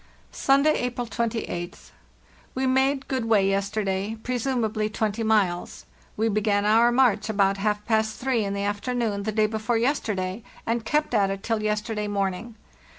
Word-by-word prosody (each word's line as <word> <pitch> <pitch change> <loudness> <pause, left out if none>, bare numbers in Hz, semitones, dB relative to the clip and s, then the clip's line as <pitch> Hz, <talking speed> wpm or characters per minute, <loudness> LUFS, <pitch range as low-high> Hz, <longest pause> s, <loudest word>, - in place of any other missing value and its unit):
"Sunday, 280 +3 +3
April 245 0 -2
28th. 225 -6 -4 0.6
We 260 +1 0
made 265 +1 +1
good 260 -3 -1
way 210 -4 +3
yester 200 +2 0
day, 195 +3 -2
presumably 235 -4 -1
20 215 0 -2
miles. 205 -6 0 0.3
We 220 +1 +1
began 205 -1 +1
our 225 +3 +5
march 240 -4 +2
about 200 -2 +2
half 210 +1 -1
past 220 -1 +1
three 250 -4 0
in 200 0 -2
the 200 - -2
afternoon 205 +1 -1
the 215 +2 -2
day 215 0 +2
before 220 +2 -1
yesterday, 215 -6 -1 0.2
and 230 0 -1
kept 300 +2 0
at 200 -3 +3
it 195 0 -4
till 225 -2 -1
yesterday 210 0 -2
morning. 200 +2 -2
220 Hz, 155 wpm, -25 LUFS, 205-235 Hz, 0.6 s, our